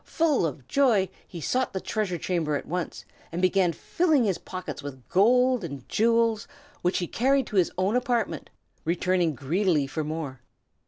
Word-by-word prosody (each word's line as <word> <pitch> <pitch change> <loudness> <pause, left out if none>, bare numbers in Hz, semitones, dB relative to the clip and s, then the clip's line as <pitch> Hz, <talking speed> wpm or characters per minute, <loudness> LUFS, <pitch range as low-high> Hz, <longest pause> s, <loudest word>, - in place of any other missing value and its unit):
Full 305 - +1
of 135 -4 -8
joy, 230 -10 +3 0.2
he 175 - -8
sought 255 - 0
the 190 - -1
treasure 195 -3 -2
chamber 165 -3 -1
at - - -3
once, 180 +2 -4 0.3
and 170 - -3
began 185 -1 +3
filling 310 - +1
his 195 -5 0
pockets 185 -7 -6
with 135 -3 -9
gold 250 +4 +4
and 140 -6 -7
jewels, 230 0 +2 0.3
which 180 +1 +1
he 175 - -1
carried 265 +8 +2
to 210 - -4
his 180 - +3
own 190 +5 +1
apartment, 245 -2 -1 0.3
returning 175 -1 +1
greedily 155 - +1
for 155 +3 -3
more. 150 -5 -5
185 Hz, 165 wpm, -26 LUFS, 160-230 Hz, 0.3 s, gold